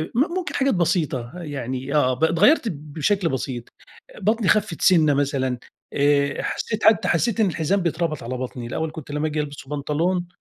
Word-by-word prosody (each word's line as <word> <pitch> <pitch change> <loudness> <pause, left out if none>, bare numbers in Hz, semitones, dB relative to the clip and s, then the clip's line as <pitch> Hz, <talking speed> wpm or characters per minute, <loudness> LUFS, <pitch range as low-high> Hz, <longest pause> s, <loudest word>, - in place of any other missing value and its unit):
م - - +2 0.2
ممكن 370 -1 -3
حاجات 275 0 +2
بسيطة 160 -8 0
يعني 135 -1 -4
آه 130 -3 +3
ب 130 - -4
اتغيّرت 175 - +4
بشكل 155 +5 -1
بسيط، 130 -3 -3 0.6
بطني 215 +1 +1
خفِّت 205 -6 +1
سِنّة 160 -6 +5
مثلًا، 135 -3 0 0.4
آآ، 140 -1 +2
حسيت 215 - -3
حتى 215 -3 +5
حسيت 210 +7 +1
إن 220 - +5
الحزام 180 +3 0
بيتربط 165 -3 -1
على 125 +2 -4
بطني، 125 -1 -5
الأول 160 +5 -3
كنت 155 -2 -9
لمّا 150 +2 -1
آجي 150 0 -2
ألبس 145 -2 -8
بنطلون 160 +5 -1
155 Hz, 165 wpm, -23 LUFS, 140-180 Hz, 0.6 s, سِنّة